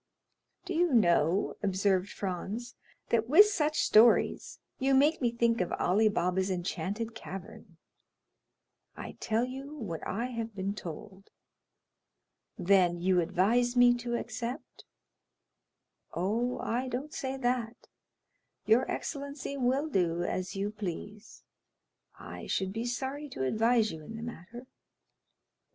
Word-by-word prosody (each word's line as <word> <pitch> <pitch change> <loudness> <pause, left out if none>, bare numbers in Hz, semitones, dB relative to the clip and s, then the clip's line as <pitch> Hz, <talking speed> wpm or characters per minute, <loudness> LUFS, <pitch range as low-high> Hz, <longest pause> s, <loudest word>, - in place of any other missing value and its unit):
"Do 370 - -4
you 340 -4 +2
know," 175 -3 +3
observed 195 -1 +1
Franz, 205 +5 -5 0.4
"that 230 0 +1
with 340 +9 +9
such 310 -7 0
stories 225 +2 +4 0.2
you 270 0 +3
make 295 +4 +3
me 240 -2 +2
think 235 -2 +1
of 180 - -2
Ali 215 +5 +3
Baba's 185 0 0
enchanted 190 +5 -3
cavern?" 190 -4 -10 1.2
"I - - -6
tell 225 +2 0
you 270 +3 -7
what 195 - -5
I 230 +5 -2
have 230 -2 -5
been 195 0 -2
told." 190 +1 -9 1.3
"Then 180 -2 +3
you 180 +1 +2
advise 225 +9 +2
me 245 0 +6
to 240 0 -3
accept?" 245 +4 -6 1.3
"Oh, 225 +8 0
I 245 +3 -2
don't 260 +4 -4
say 265 0 -3
that; 245 -2 -2 0.8
your 225 +5 +3
excellency 280 -1 -4
will 265 +3 +1
do 175 - 0
as 185 +1 -3
you 200 +1 -2
please; 210 +1 -7 0.7
I - - -9
should 190 0 -1
be 225 +2 -3
sorry 265 +5 -4
to 130 - -4
advise 225 - +2
you 160 - -8
in 225 +8 -8
the 225 - -7
matter." 235 +2 -9
225 Hz, 125 wpm, -30 LUFS, 190-250 Hz, 1.3 s, with